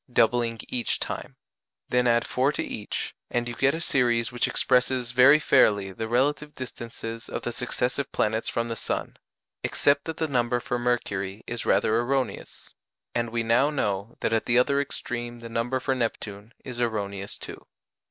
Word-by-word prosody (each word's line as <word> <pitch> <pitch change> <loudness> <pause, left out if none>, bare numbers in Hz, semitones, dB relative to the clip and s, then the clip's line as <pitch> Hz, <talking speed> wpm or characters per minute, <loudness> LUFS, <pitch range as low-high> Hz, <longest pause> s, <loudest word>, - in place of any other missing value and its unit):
doubling 115 0 +3
each 125 -2 -1
time; - - -5 0.5
then 125 0 +3
add 120 -1 +3
4 130 +3 +2
to - - -1
each, 105 - -4 0.2
and 120 0 -1
you 120 - -4
get 140 +4 +2
a - - -3
series 120 -7 +1
which 120 -1 +1
expresses 125 -1 +2
very 130 +4 +7
fairly 105 -9 +4
the 110 +4 -4
relative 145 +5 +1
distances 115 -2 -7
of - - -4
the 120 - -2
successive 125 +3 -2
planets 110 +1 0
from 115 0 -1
the 115 - -3
sun, - - -3 0.5
except 140 0 +2
that 160 -1 -4
the 160 - 0
number 120 -3 +1
for 120 0 -2
Mercury 100 -5 -1
is 120 -1 -4
rather 110 +1 +3
erroneous, 130 +1 -2 0.4
and 120 -1 0
we 115 0 -1
now 115 +5 +4
know 105 -7 -2
that - - +1
at 115 - +1
the 120 - +4
other 140 +3 +4
extreme 120 -3 -4
the 115 0 -9
number 120 +3 -1
for 130 +1 0
Neptune 110 -3 -3
is 125 -2 -5
erroneous 100 -4 -2
too. - - -9
120 Hz, 170 wpm, -26 LUFS, 115-130 Hz, 0.5 s, very